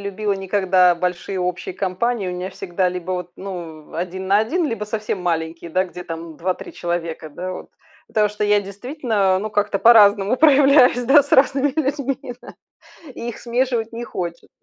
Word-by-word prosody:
любила 200 +1 -2
никогда 190 -2 +3
большие 180 +2 -3
общие 180 0 -3
компании. 195 +3 -1
У 180 - -3
меня 180 +1 -5
всегда 185 0 -1
либо 180 0 -4
вот 180 -1 -4
ну 170 -5 -8
1 185 +2 -4
на 200 +2 +4
1, 310 +11 0
либо 230 -6 -3
совсем 210 -3 -4
маленькие, 165 -1 -3
да 185 +3 +1
где 180 -1 -9
там 165 -2 -8
2-3 180 +2 -4
человека, 170 -2 -4
да, 185 +5 -5
вот. - - -9 0.4
Потому 210 -1 +2
что 210 0 -6
я 205 0 +3
действительно, 205 -2 -1
ну 215 +3 -4
как-то 205 -1 0
по-разному 210 0 +6
проявляюсь, 275 -4 +5
да, 280 +4 +6
с 285 - -15
разными 275 +1 +4
людьми, 275 -2 -3
да, - - -12 0.6
и 235 - -5
их 235 - -8
смешивать 240 -2 -1
не 235 - -5
хочется. 175 -7 -6
200 Hz, 170 wpm, -21 LUFS, 180-235 Hz, 0.6 s, по-разному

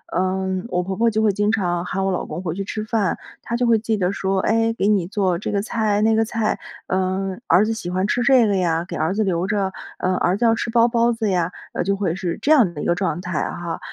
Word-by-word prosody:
嗯， 185 +1 -1
我 180 -3 0
婆 190 +1 -4
婆 230 +3 +3
就 220 0 0
会 215 -2 +3
经 205 +2 +1
常 175 -5 0
喊 195 +1 -2
我 195 - +1
老 180 - -2
公 175 - -6
回 165 -4 -3
去 195 - -3
吃 215 +2 -4
饭， 215 -4 0 0.2
她 235 - -4
就 245 0 +1
会 230 -1 +5
记 220 0 -1
得 185 -1 0
说， 195 -1 -1
哎， 225 +3 +2
给 205 -3 0
你 200 -5 +2
做 190 -3 0
这 195 - -4
个 200 -1 0
菜、 215 -2 0
那 220 +1 +3
个 225 - +3
菜， 220 -1 -1 0.3
嗯， 190 +2 -1
儿 185 +5 +5
子 225 - -1
喜 200 -6 -5
欢 185 +2 0
吃 245 +3 0
这 245 -2 +5
个 200 - +1
呀， 170 -2 0
给 - - -6
儿 160 +4 0
子 215 +2 +1
留 180 -2 0
着， 195 -2 0 0.3
呃， 185 0 0
儿 180 +3 +1
子 240 - +1
要 225 0 +4
吃 240 - -3
包 230 0 +4
包 235 0 +2
子 225 -2 -1
呀， 175 -2 0 0.2
呃， - - -1
就 195 +2 0
会 185 -4 -1
是 180 -3 -3
这 295 - +1
样 240 - +5
的 150 - -6
一 - - -4
个 175 - +2
状 175 -3 -1
态 180 -3 -2
哈。 170 -1 -5
195 Hz, 290 characters per minute, -21 LUFS, 185-220 Hz, 0.3 s, 会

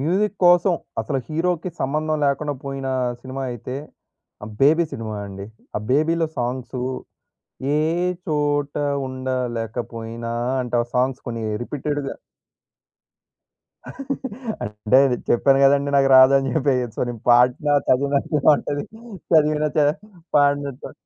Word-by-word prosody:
Music 195 +8 0
కోసం, 175 +1 +5 0.3
అసలు 140 -3 -2
హీరోకి 170 +2 -1
సంబంధం 155 +3 0
లేకుండా 145 +1 0
పోయిన 135 -1 -4 0.3
సినిమా 135 +1 -6
అయితే 120 +2 -6 0.7
ఆహ్, 110 - -9
'బేబీ' 160 +4 +4
సినిమా 110 -2 -5
అండి. 100 0 -8 0.3
ఆ - - +1
'బేబీలో' 160 +3 +2
సాంగ్సు 125 +1 -3 0.9
'ఏ 150 - +2 0.5
చోట 145 -2 0 0.3
ఉండలేకపోయినా!' 120 -2 -4 0.3
అంటే, 125 -1 -3
ఆ - - -11
సాంగ్స్ 130 +1 0
కొన్ని 115 -2 -4 0.2
రిపీటెడ్‌గా 145 +1 -3 2.5
అంటే, 105 +4 0
అది 125 -2 0
చెప్పాను 135 +3 +4
కదండీ! 140 +1 +3
నాకు 135 0 +4
రాదని 135 +1 +6
చెప్పేయ్యొచ్చు, 130 -6 0
నేను 115 -3 -6
పాడిన 125 +4 +4
చదివినట్టే 140 +3 +1
ఉంటది. 145 0 -3 0.5
చదివిన 155 -1 +4
చ - - +2 0.6
పాడిన‌ట్టు 145 -1 +1
135 Hz, 110 wpm, -22 LUFS, 125-150 Hz, 2.5 s, రాదని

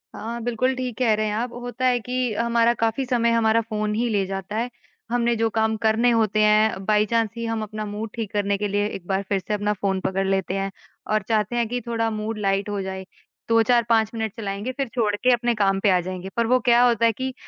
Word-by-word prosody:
हाँ, 235 +2 -5
बिल्कुल, 245 +2 0
ठीक 255 -3 -4
कह 235 -4 +3
रहे 215 - -1
हैं 210 - -2
आप, 235 +3 -2
होता 245 +1 -4
है 250 -1 +3
कि 250 -1 -2
हमारा 235 +1 +2
काफ़ी 230 +4 0
समय 235 -2 +1
हमारा 230 0 +3
फ़ोन 215 -1 -2
ही 240 +2 0
ले 200 -3 +1
जाता 195 +2 -5
है, 235 +2 -1 0.4
हमने 235 -1 +2
जो 225 0 +1
काम 220 0 +1
करने 225 +3 +3
होते 220 -2 +2
हैं, 210 -2 +3
बाई-चांस 215 +1 +2
ही 230 - -3
हम 225 -1 -2
अपना 215 0 -5
मूड 210 +2 -5
ठीक 225 -3 -4
करने 200 -1 0
के 205 0 -1
लिए 205 +1 0
एक 180 -4 -8
बार 195 0 0
फिर 200 -1 +1
से 210 - -5
अपना 210 0 0
फ़ोन 195 -1 -1
पकड़ 190 +1 -1
लेते 190 -1 0
हैं 195 0 -2 0.4
और 215 - +2
चाहते 215 +1 +1
हैं 235 -2 +1
कि 245 +2 -2
थोड़ा 230 -1 0
मूड 215 0 -4
लाइट 195 0 0
हो 205 -1 -2
जाए। 190 0 -5 0.4
2-4-5 230 -1 +3
मिनट 220 -2 -3
चलाएँगे 205 +3 -3
फिर 275 0 -3
छोड़ 210 -4 +1
के 250 +4 +2
अपने 240 -1 +1
काम 195 -2 +2
पे 200 - +2
आ 180 - +4
जाएँगे, 185 +1 -6
पर 235 - +2
वो 255 +2 +4
क्या 240 +1 +6
होता 230 -1 +2
है 230 - +5
कि 260 +3 -4
220 Hz, 235 wpm, -23 LUFS, 205-235 Hz, 0.4 s, क्या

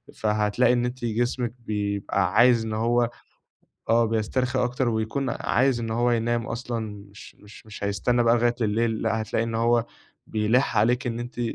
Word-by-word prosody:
فهتلاقي 105 +3 +2
إن 120 0 +1
أنتِ 125 0 -4
جسمِك 120 +1 -1
بيبقى 100 -3 -2
عايز 120 -2 +5
إن 110 - -4
هو 120 +2 +1 0.8
آه، 115 +1 +4
بيسترخي 120 +4 -1
أكتر، 125 +1 -1
ويكون 115 +4 -1
عايز 125 +1 +1
إن 115 -1 -4
هو 120 +2 +1
ينام 115 0 0
أصلًا، 120 0 -4 0.3
مش 105 - -13
مش 105 +1 -15
مش 105 -1 -8
هيستنى 120 +5 +1
بقى 115 0 +4
لغاية 120 0 +2
الليل، 110 +1 0
لأ، 110 0 0
هتلاقي 110 +1 -1
إن 115 0 -4
هو 115 +1 +2 0.4
بيلِحّ 110 +5 +1
عليكِ 120 +5 +2
إن 120 -1 -2
أنتِ 120 0 -7
115 Hz, 165 wpm, -25 LUFS, 110-120 Hz, 0.8 s, عايز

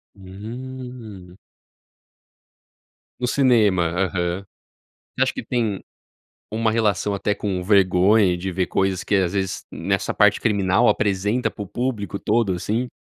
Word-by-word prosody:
Hum. 110 -1 -9 1.8
No 125 - -1
cinema, 110 -10 +3
aham. 90 0 -1 0.7
Você - - -3
acha - - -1
que - - -6
tem 110 -6 -1 0.7
uma 110 0 +1
relação 105 -3 +1
até 100 +1 -1
com 95 -3 -2
vergonha 95 0 +4
de 95 +2 -4
ver 90 0 -1
coisas 95 -2 0
que, 105 - 0
às 95 -1 +1
vezes, 95 -1 -2
nessa - - -1
parte - - +4
criminal 100 +2 +2
apresenta 105 +4 +1
para 105 - -7
o - - -10
público 115 -4 -3
todo, 105 -1 +1
assim? 110 +8 -2
100 Hz, 130 wpm, -22 LUFS, 95-115 Hz, 1.8 s, vergonha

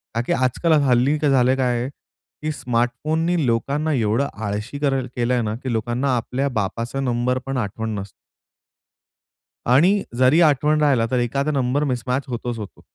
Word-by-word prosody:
का 115 - +1
की - - +2
आजकाल 130 +6 +1
हल्ली 130 +3 +3
काय 150 -1 +2
झालेलं 130 0 +3
आहे, 125 0 0 0.5
की 155 0 -2
स्मार्टफोननी 155 +6 0
लोकांना 140 +7 0
एवढं 115 +2 +1 0.2
आळशी 105 +7 -4
करं 135 -3 0
केलंय 120 0 +1
ना, 110 -1 -2
की 125 +1 -4
लोकांना 120 +4 0
आपल्या 130 +4 -2
बापाचा 115 +6 -3
नंबर 125 0 0
पण 135 -1 -3
आठवण 110 0 -3
नस 100 +1 -7 1.6
आणि 175 - +4
जरी 130 +6 +5
आठवण 150 0 +3
राहिला, 135 -6 +3
तर 125 - +2
एखादा 135 +5 0
नंबर 135 0 0
मिसमॅच 130 0 -1
होतोच 120 -1 -4
होतो. 105 -3 -9
125 Hz, 155 wpm, -22 LUFS, 120-140 Hz, 1.6 s, जरी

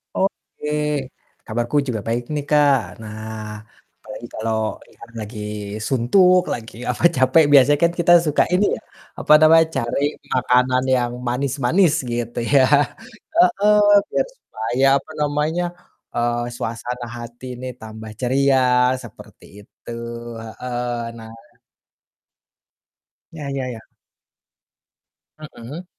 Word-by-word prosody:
Oke 190 -5 -3 0.8
kabarku 120 +4 -2
juga 110 -4 -2
baik 120 +1 -1
nih 145 -1 -3
Kak, 145 -3 +4 0.2
nah 110 0 -7 0.4
apalagi - - -9
kalau 110 -1 -2
ini - - -22
kan 115 - -12
lagi 105 +1 -7 0.5
suntuk 180 +9 +4
lagi 115 -1 -7 0.2
apa 125 - -3
capek 130 +5 +4
biasanya 140 +1 +6
kan 170 - +3
kita 175 0 +5
suka 150 -1 +3
ini 200 +3 +3
ya, - - -13 0.4
apa 150 - +4
namanya 160 +1 +7
cari 120 +2 -1 0.3
makanan 125 0 +2
yang 120 -1 0 0.2
manis-manis 140 +7 +1 0.2
gitu 120 0 -3
ya, 135 -2 +6 0.7
heeh, 265 - +4 0.3
biar - - 0
supaya 120 - -3
apa 150 - -16
namanya, 150 +3 0 0.5
eee, 120 0 0
suasana 120 0 -5
hati 120 +1 -10
ini 125 +1 -8
tambah 110 0 -9
ceria 135 +1 +2 0.4
seperti - - -14 0.2
itu, 110 - -12 0.5
heeh, 120 +1 -4 0.2
nah. 110 0 -11 2.0
Ya 150 -3 -7
ya 135 -2 -3
ya. 115 -3 -7 1.6
Mhm. 150 +3 -9
125 Hz, 115 wpm, -21 LUFS, 120-150 Hz, 2.0 s, namanya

